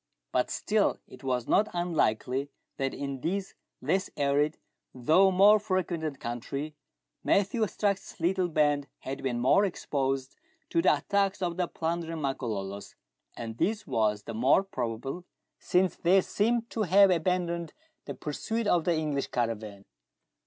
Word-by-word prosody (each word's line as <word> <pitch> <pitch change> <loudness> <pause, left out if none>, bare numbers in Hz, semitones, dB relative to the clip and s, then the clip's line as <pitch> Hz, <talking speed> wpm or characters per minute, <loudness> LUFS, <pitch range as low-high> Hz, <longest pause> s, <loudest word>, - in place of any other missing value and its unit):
But - - +1
still - - +1
it - - -14
was 125 -3 -1
not 215 - +3
unlikely 140 -6 0 0.3
that 135 -1 -1
in 140 -2 -5
this 195 +5 -2 0.3
less 190 +1 0
arid, 145 +2 +1 0.4
though 160 +10 +4
more 200 +3 +6
frequented 175 -7 -2
country, 140 +6 -4 0.5
Matthew 200 +4 +2
Strux's 200 -1 -2
little 180 +2 +1
band 145 -3 +1
had 135 - -5
been 125 -3 -1
more 130 +11 +4
exposed 135 -8 -2 0.4
to 165 - +3
the 165 -4 +4
attacks 195 +5 0
of 175 -1 -1
the 180 -1 0
plundering 165 0 -3
Makololos, 105 -8 -4 0.4
and 115 -1 -6
this 210 +1 0
was 105 -2 0
the 115 - -6
more 130 - +4
probable, 130 - -4 0.4
since 180 -1 +2
they 185 +3 +4
seemed 230 +4 0
to 225 - -2
have 195 0 +6
abandoned 170 -1 0 0.3
the - - -6
pursuit 220 +10 -3
of 175 -5 +2
the 175 - +2
English 150 -3 -1
caravan. 110 -4 -3
160 Hz, 140 wpm, -29 LUFS, 130-190 Hz, 0.5 s, more